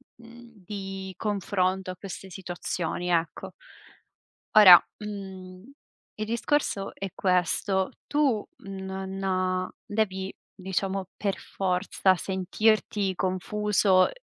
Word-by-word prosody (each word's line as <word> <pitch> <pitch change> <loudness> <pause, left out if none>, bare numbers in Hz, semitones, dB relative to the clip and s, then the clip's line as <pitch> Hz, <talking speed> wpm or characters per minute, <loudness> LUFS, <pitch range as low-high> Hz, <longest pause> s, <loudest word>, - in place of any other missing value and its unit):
mhmm, 235 -2 -16
di 195 -1 -6
confronto 190 -2 0
a 185 - -9
queste 195 0 -8
situazioni, 180 -1 -4
ecco. 165 -2 -1 1.0
Ora, 185 -5 +11 0.2
uhm, 190 -3 -8 0.5
il 215 - -4
discorso 230 -3 0
è 195 - -4
questo. 190 +1 +1 0.2
Tu 280 -8 +1 0.2
non 190 -1 -2
devi, 195 -3 -1 0.2
diciamo 190 0 -2
per 200 -2 -1
forza 185 0 +1
sentirti 195 +2 +1
confuso 190 +1 +2
190 Hz, 90 wpm, -27 LUFS, 185-210 Hz, 1.0 s, Ora